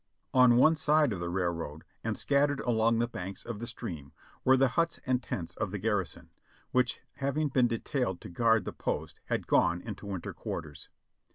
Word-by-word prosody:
On 125 -2 +7
one 155 +6 +6
side 150 -4 +3
of 95 - -4
the 85 0 -3
railroad, 85 -4 -2 0.2
and - - -1
scattered 140 0 +2
along 115 -1 +2
the 120 +1 +1
banks 95 -4 -6
of 115 -3 -5
the 120 - -5
stream, 80 - -6 0.3
were 130 +1 +5
the 135 0 +4
huts 165 +6 0
and 130 -1 +1
tents 85 -8 -4
of 110 -2 -2
the 100 - -4
garrison, 100 -3 -2 0.4
which 125 -1 +1 0.2
having 140 +2 0
been 125 -2 +3
detailed 115 - -1
to - - -8
guard 115 +1 +3
the - - -4
post - - -3
had - - -2
gone 85 +2 +3
into 105 0 -7
winter 95 -3 -4
quarters. 75 -2 -6
115 Hz, 185 wpm, -30 LUFS, 95-130 Hz, 0.4 s, On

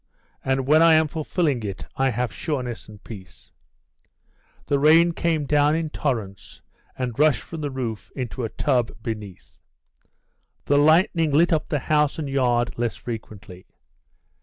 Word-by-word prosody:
And 135 0 0
when 155 +4 +5
I 165 -1 +6
am 155 0 +3
fulfilling 155 -3 -1
it 100 -3 -6
I 135 0 +1
have 125 0 -2
sureness 125 -7 -4
and 105 -1 -14
peace." 95 -5 -12 1.1
The 140 - +1
rain 165 +4 +5
came 165 -3 -1
down 145 +1 +3
in 160 -2 -2
torrents 110 -11 -4 0.3
and 125 -2 -4
rushed 150 -2 +3
from 165 -2 -8
the 145 - -2
roof 120 -5 -5
into 125 -1 -4
a 115 - -2
tub 125 -3 0
beneath; 105 -5 -7 1.1
the 145 0 +3
lightning 160 +1 +3
lit 165 +5 +3
up 155 - -1
the 150 - 0
house 150 +2 +1
and 155 -3 -4
yard 120 -4 0
less 120 -1 -1
frequently. 110 -5 -9
135 Hz, 150 wpm, -23 LUFS, 115-155 Hz, 1.1 s, I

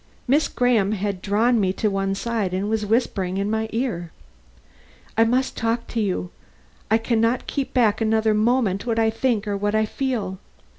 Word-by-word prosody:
Miss 290 +5 +3
Graham 230 -5 +2
had 200 -2 -3
drawn 225 +5 +2
me 185 -2 +2
to 215 - -1
one 195 0 -1
side 210 -4 -2
and 195 +2 -1
was 215 -1 -1
whispering 195 -5 0
in 200 +2 -1
my 220 0 -1
ear: 195 -9 -2 1.0
"I 225 - +5
must 255 +3 0
talk 230 0 -1
to 230 - -1
you. 185 -3 -2 0.6
I 220 - +5
can 225 0 0
not 230 +2 +1
keep 275 -2 -3
back 230 -4 +2
another 220 0 +2
moment 215 -2 +1
what 230 -1 0
I 225 -1 +3
think 225 -2 0
or 205 - -1
what 205 +1 -1
I 215 0 +3
feel. 215 -6 -3
220 Hz, 185 wpm, -23 LUFS, 200-235 Hz, 1.0 s, I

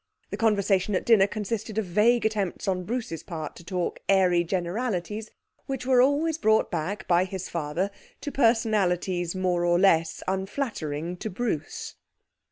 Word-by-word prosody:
The - - -2
conversation 200 -2 +2
at - - -1
dinner 215 -4 +6
consisted 215 +1 -4
of 220 - +1
vague 215 +7 +3
attempts 205 -5 -1
on 185 -2 -1
Bruce's 220 -8 -3
part 160 -4 -6
to 170 - -12
talk 175 0 -3
airy 180 -3 +4
generalities, 190 +3 -2 0.4
which 270 -2 -4
were 255 -1 +5
always 300 +4 +2
brought 220 -3 +3
back 175 +4 -3
by 175 0 +4
his 190 0 -5
father 170 +4 -2 0.3
to 290 - -4
personalities 195 -8 +1
more 180 -2 0
or 175 0 +3
less 165 -4 +3
unflattering 185 - -3
to 220 - -4
Bruce. 200 -5 -4
195 Hz, 150 wpm, -26 LUFS, 175-220 Hz, 0.4 s, dinner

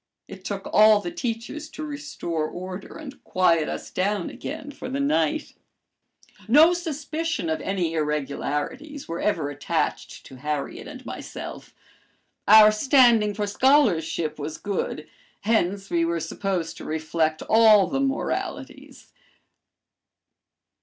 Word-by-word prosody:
It - - -11
took - - -5
all 215 0 +7
the 345 - -5
teachers 280 0 -4
to 310 -1 -8
restore 285 - -4
order 185 +2 -8
and 280 -3 -10
quiet 170 -4 +2
us - - -6
down 195 -1 -1
again 295 -1 -7
for 275 - -8
the 270 +2 -3
night. 285 +2 0 0.9
No 305 +9 +7
suspicion 320 - -3
of 160 - -2
any 180 -4 -1
irregularities 150 - -3
were 165 +1 -4
ever 160 -9 0
attached 145 - -3
to 130 - -12
Harriet 150 +1 -4
and - - -10
myself. - - -8 0.7
Our 215 0 +9
standing 230 -3 +4
for 210 - -1
scholarship 200 - +2
was 150 +2 -5
good, 185 -6 -3 0.3
hence 200 -2 0
we 170 -1 +2
were 170 0 0
supposed 175 -2 -3
to - - -9
reflect 160 0 -1
all 220 -3 +6
the 270 - -2
moralities. 275 0 -4
205 Hz, 125 wpm, -24 LUFS, 165-275 Hz, 0.9 s, Our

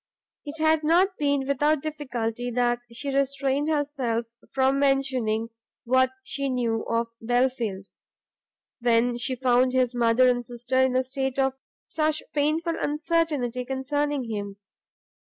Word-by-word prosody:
It 295 +2 -6
had 315 0 +3
not 360 +5 +3
been 285 -2 +1
without 290 +1 +1
difficulty 245 -6 -3
that 240 0 +1
she 235 +5 -4
had 275 0 +2
restrained 275 +1 0
herself 280 -6 -1 0.3
from 270 +1 +2
mentioning 260 -5 +1 0.3
what 260 +1 +3
she 275 0 -2
knew 235 -3 0
of 230 0 0
Belfield, 240 -5 0 0.9
when 240 0 +2
she 255 +2 -1
found 255 0 +2
his 255 -1 +2
mother 240 +1 +4
and 245 -1 +2
sister 245 +2 -3
in 260 -1 +3
a 255 - +3
state 265 0 -3
of 270 -1 +2 0.3
such 310 -1 0
painful 310 +3 +1
uncertainty 295 -5 0
concerning 280 +2 -1
him. 205 -3 -5
260 Hz, 135 wpm, -25 LUFS, 240-290 Hz, 0.9 s, mother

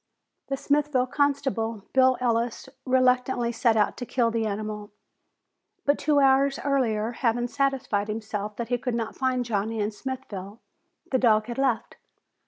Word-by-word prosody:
The 275 - -2
Smithville 285 -2 +1
constable, 265 -6 -1
Bill 260 -1 +5
Ellis, 235 0 -1 0.2
reluctantly 250 -1 +2
set 230 -1 +2
out 210 - +1
to - - -5
kill 235 -3 +1
the 225 -1 0
animal. 210 0 -5 0.9
But 285 0 +2
two 295 -1 +3
hours 275 0 +4
earlier, 235 -6 +1
having 240 0 0
satisfied 255 -6 0
himself 215 -1 -4
that 235 +1 -5
he 245 -1 0
would 250 -3 -1
not 225 -1 -3
find 255 -2 0
Johnny 220 0 -2
in 210 +1 0
Smithville, 210 -4 -7 0.5
the 260 - +2
dog 215 -3 +4
had 240 +2 -5
left. 260 -4 0
240 Hz, 150 wpm, -26 LUFS, 220-265 Hz, 0.9 s, Bill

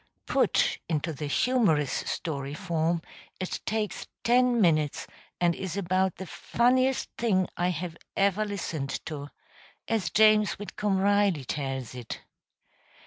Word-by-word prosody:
Put - - +2
into 160 0 -1
the 150 +1 -4
humorous 160 - +2
story 140 -3 -3
form 165 -2 0 0.4
it 185 - -3
takes 215 -1 -2 0.2
ten 245 0 +4
minutes, 155 -7 +2 0.3
and 175 -1 +3
is 190 +2 -5
about 185 -1 +1
the 190 - -7
funniest 255 +7 +1
thing 190 -6 +2
I 175 +1 +1
have 175 -1 -4 0.2
ever 200 +1 +3
listened 170 -9 -4
to 145 -2 -6 0.6
as 215 -7 0
James 215 0 +5
Whitcomb 205 -1 -2
Riley 200 -7 +2
tells 135 -3 -3
it. 125 -3 -7
185 Hz, 125 wpm, -28 LUFS, 155-210 Hz, 0.6 s, James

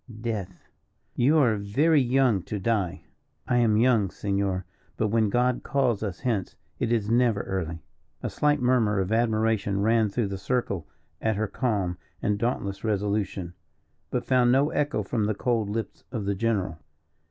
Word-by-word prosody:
"Death." 100 -6 -5 0.5
"You 140 +6 +3
are 120 -8 +4
very 140 +10 +3
young 125 -5 +2
to 105 - -3
die." 100 -3 -1 0.4
"I 125 - +2
am 115 -3 +3
young, 115 -4 +3
Senor; 100 -1 -1 0.3
but 110 - +1
when 110 -1 +2
God 125 +3 +1
calls 125 -7 0
us 100 -4 -4
hence 115 -8 -1 0.2
it 115 - 0
is 110 -2 +1
never 115 -4 +3
early." 85 -4 -4 0.4
A - - -1
slight 150 -1 +2
murmur 120 -5 +2
of 95 +1 -1
admiration 110 -3 +1
ran 110 +1 +3
through 105 0 -1
the 100 -1 -4
circle 100 - -2 0.3
at 110 -1 +1
her 110 +2 0
calm 100 -6 -1 0.2
and 105 -1 0
dauntless 100 -5 -2
resolution, 100 -4 -1 0.6
but - - -2
found 125 -2 +4
no 140 +4 +3
echo 145 -7 0
from 110 +1 -1
the 105 0 0
cold 115 -2 0
lips 110 0 -4
of 110 -6 -3
the 100 - +1
general. 95 -5 -1
110 Hz, 165 wpm, -26 LUFS, 100-120 Hz, 0.6 s, are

